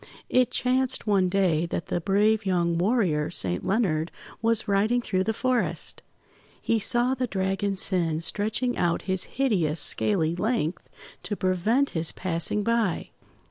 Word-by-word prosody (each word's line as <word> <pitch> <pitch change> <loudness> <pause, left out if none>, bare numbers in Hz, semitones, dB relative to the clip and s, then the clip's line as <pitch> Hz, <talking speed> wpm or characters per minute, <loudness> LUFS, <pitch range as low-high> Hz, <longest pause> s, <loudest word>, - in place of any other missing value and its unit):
It 250 -1 +3
chanced 255 +1 +1
one 195 -4 +2
day 175 -4 +1
that 170 - -4
the 175 - -1
brave 210 +4 +2
young 175 -3 0
warrior, 175 -5 +1
Saint 90 -1 -2
Leonard, 175 -7 0 0.3
was 230 -1 +1
riding 210 +5 +2
through 190 -5 -1
the 220 - +1
forest. 250 +1 -2 0.6
He 230 - 0
saw 240 +4 +2
the 255 -1 -2
Dragon 195 0 -2
Sin 175 -5 +2
stretching 215 +7 -1
out 170 -1 0
his 190 -1 0
hideous 180 - 0
scaly 165 -1 +2
length 185 -4 -2 0.3
to 205 - -4
prevent 205 +9 0
his 160 -1 -2
passing 185 +3 -2
by. 230 -5 -1
195 Hz, 140 wpm, -25 LUFS, 175-230 Hz, 0.6 s, It